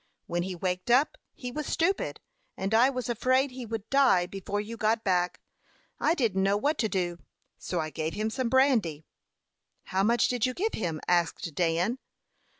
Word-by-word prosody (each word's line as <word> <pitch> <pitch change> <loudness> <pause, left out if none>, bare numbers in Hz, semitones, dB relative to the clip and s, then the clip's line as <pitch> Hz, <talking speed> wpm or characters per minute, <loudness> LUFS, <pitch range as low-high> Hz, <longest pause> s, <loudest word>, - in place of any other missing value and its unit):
When 175 0 -1
he 185 +1 -4
waked 180 +3 -3
up 260 +6 +4 0.2
he 250 -1 -6
was 300 +3 -4
stupid, 385 +4 0 0.4
and 195 +3 -2
I 235 +4 +6
was 255 -4 -3
afraid 255 +3 +2
he 250 -2 -7
would 220 -1 -5
die 270 -10 +5
before 195 +2 -4
you 215 +3 -5
got 220 0 +1
back. 180 -2 +1 0.6
I 325 - +2
didn't 220 - +1
know 195 +1 +3
what 290 +7 0
to 220 - +1
do; 175 -3 -1 0.4
so 180 - -3
I 155 -1 -3
gave 160 +2 -3
him 215 +1 -1
some 255 0 -1
brandy." 230 - +2 0.8
"How 190 - -1
much 230 +3 +3
did 245 -3 -1
you 255 - -4
give 440 +4 -1
him?" 165 -7 -3
asked 170 -2 +1
Dan. 175 - +1
215 Hz, 180 wpm, -28 LUFS, 180-255 Hz, 0.8 s, I